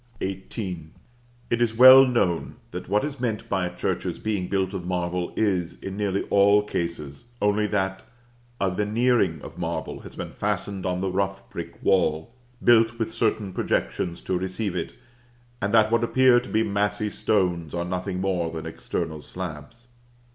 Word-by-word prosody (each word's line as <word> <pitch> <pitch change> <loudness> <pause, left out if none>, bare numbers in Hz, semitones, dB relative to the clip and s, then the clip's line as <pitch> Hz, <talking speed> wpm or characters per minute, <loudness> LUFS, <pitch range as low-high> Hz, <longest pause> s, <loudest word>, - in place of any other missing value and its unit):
XVIII. 95 -3 -5 0.6
It 120 0 +1
is 115 -1 +1
well 130 +2 +10
known, 95 -9 0 0.2
that - - -7
what 105 +1 +2
is 145 -2 -6
meant 115 -2 -2
by 95 -4 0
a 90 - -9
church's 90 - -2
being 105 -4 -2
built 95 0 -1
of 95 -2 -4
marble 90 0 -2
is, 95 -6 0
in 95 0 -6
nearly 100 -1 -1
all 100 +1 +5
cases, 85 -5 -4
only 105 +1 +2
that 95 -2 -1 0.6
a 95 -1 +1
veneering 105 -3 +1
of 80 +3 -10
marble 80 -2 -3
has - - -11
been - - -6
fastened 95 -2 -2
on 90 0 -1
the 95 -1 -1
rough 95 +1 -2
brick - - -8
wall, 85 +2 +1 0.3
built 115 -1 +5
with 110 -1 -2
certain 105 -4 0
projections 85 -1 -1
to 90 - -1
receive 95 +1 -3
it; 85 - -4 0.7
and 100 - 0
that 110 0 +4
what 115 0 +3
appear 130 +1 +5
to 125 - -10
be 110 +1 +2
massy 105 +1 -1
stones, 90 -8 0
are 85 0 -2
nothing 90 +1 -3
more 90 -3 0
than 80 -1 -6
external 80 -1 -4
slabs. 90 +8 -7
95 Hz, 165 wpm, -25 LUFS, 90-110 Hz, 0.7 s, well